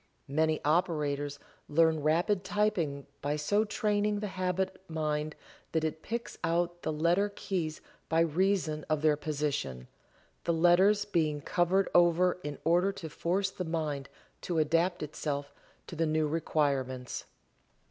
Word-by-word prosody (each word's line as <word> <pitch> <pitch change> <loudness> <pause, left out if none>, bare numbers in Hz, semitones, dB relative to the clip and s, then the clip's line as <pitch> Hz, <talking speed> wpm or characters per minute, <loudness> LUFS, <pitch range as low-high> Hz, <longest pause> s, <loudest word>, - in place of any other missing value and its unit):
Many 155 +2 +1
operators 150 -3 +1 0.3
learn 160 +1 +4
rapid 175 +6 +2
typewriting 190 -8 0 0.2
by 145 +1 0
so 205 +8 +2
training 210 -1 0
the 210 -1 -3
habit 185 0 -1
mind 155 -1 -2 0.4
that 160 -1 +1
it 160 0 -2
picks 235 +5 -5
out 175 +1 0
the - - -1
letter 170 +6 +2
keys 165 -5 -3 0.3
by 165 0 +3
reason 165 -2 +1
of 155 -1 0
their 155 -1 +5
position, 145 - -3 0.6
the 170 - +1
letters 185 +5 +4
being 160 -7 0
covered 180 +6 +2
over 175 +1 +4
in 145 -1 -4
order 175 +4 +3
to 165 -4 -7
force 190 +5 0
the 185 - -4
mind 155 -5 -3 0.3
to 175 - -2
adapt 165 +3 +2
itself 145 -1 -4 0.3
to - - -8
the 165 0 +1
new 155 0 +1
requirements. 140 -5 -1
165 Hz, 135 wpm, -30 LUFS, 150-180 Hz, 0.6 s, their